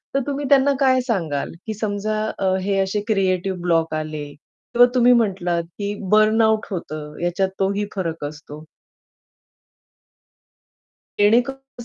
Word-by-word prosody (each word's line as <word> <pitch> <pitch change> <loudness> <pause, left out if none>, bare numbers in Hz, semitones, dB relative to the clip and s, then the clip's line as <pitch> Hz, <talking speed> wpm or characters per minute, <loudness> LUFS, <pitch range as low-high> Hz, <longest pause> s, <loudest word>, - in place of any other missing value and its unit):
तर - - +4
तुम्ही 285 0 -2
त्यांना 280 0 +5
काय 260 -2 +4
सांगाल? 170 - -2 0.2
की 220 - -2
समजा 215 0 -2 0.2
अ, 190 -1 +1
हे 195 +1 0
असे 195 +2 0
क्रिएटिव्ह 190 -3 0
ब्लॉक 165 -2 +1
आले 155 -1 -4
किंवा 240 +10 +1
तुम्ही 245 0 +6
म्हटलात 185 -7 +1 0.2
की 205 0 -2 0.2
बर्नआउट 215 0 +4
होतं, 155 -4 -6
ह्याच्यात 175 +2 0
तोही 200 +1 0
फरक 165 -5 -3
असतो 150 0 -9 2.6
जेणेकरून 245 +4 +1
200 Hz, 120 wpm, -21 LUFS, 175-225 Hz, 2.6 s, तुम्ही